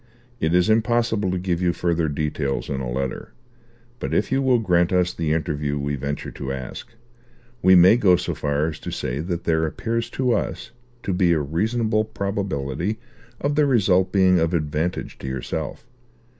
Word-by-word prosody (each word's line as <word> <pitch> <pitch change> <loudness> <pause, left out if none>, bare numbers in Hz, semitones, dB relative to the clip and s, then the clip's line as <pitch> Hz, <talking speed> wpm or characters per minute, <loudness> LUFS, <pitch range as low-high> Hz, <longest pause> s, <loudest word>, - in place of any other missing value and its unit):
It 80 +2 +1
is 90 0 +4
impossible 115 -2 +2
to 90 - -1
give 90 -1 -1
you 90 -1 +2
further 85 -2 0
details 75 -2 -2
in 65 -1 -2
a 65 - -3
letter; 65 +1 -4 0.7
but - - -2
if - - 0
you 135 +1 +2
will 130 -2 +4
grant 90 -6 +2
us 90 -1 +2
the 80 -2 -2
interview 75 -3 -1
we 70 0 -2
venture 70 +1 -4
to 65 - -5
ask, 65 - -6 0.7
we 95 -1 +6
may 90 +5 +7
go 95 -6 +5
so - - -2
far 75 +1 0
as 80 -1 -4
to - - -6
say 65 +3 -3
that 85 +1 -3
there 80 -1 +1
appears 115 +9 -2
to 130 -2 +2
us 115 0 -2 0.3
to 95 - -1
be 90 -1 +3
a 80 - +2
reasonable 110 +9 0
probability 100 -4 -3 0.4
of 145 +1 0
the 150 0 +3
result 95 -7 +3
being 95 -2 +4
of 80 +1 +1
advantage 75 +2 -2
to - - -7
yourself. 65 - -4
90 Hz, 180 wpm, -23 LUFS, 75-105 Hz, 0.7 s, may